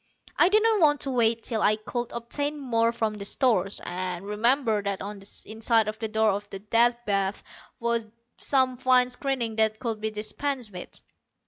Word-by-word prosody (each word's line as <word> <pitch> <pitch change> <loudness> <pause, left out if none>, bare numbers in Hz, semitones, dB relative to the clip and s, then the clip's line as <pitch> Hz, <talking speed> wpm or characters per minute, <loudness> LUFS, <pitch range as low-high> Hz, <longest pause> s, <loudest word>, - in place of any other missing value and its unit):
I 345 - +5
didn't 430 +1 +3
want 295 -4 +4
to 275 - -1
wait 230 -2 +2
till 225 -3 -2
I 215 - +4
could 240 +2 -5
obtain 285 +6 -3
more 230 -4 +1
from 225 -2 -1
the 210 -1 -7
stores, 200 -3 +1
and 180 +1 -4
remembered 220 0 +1
that 200 -1 -1
on 205 +1 -6
the 195 - -7
inside 225 0 +1
of 215 0 -4
the 225 - -2
door 215 -2 +1
to 205 - -25
the 195 - -6
Death 230 +4 +3
Bath 195 -1 -1
there - - -17 0.2
was 230 -1 0 0.3
some 260 -2 +2
fine 250 0 +3
screening 245 -3 -2
that 220 -1 +2
could 225 -3 -4
be 220 - -1
dispensed 215 +3 -3
with. 180 -1 -8
225 Hz, 190 wpm, -26 LUFS, 210-250 Hz, 0.3 s, I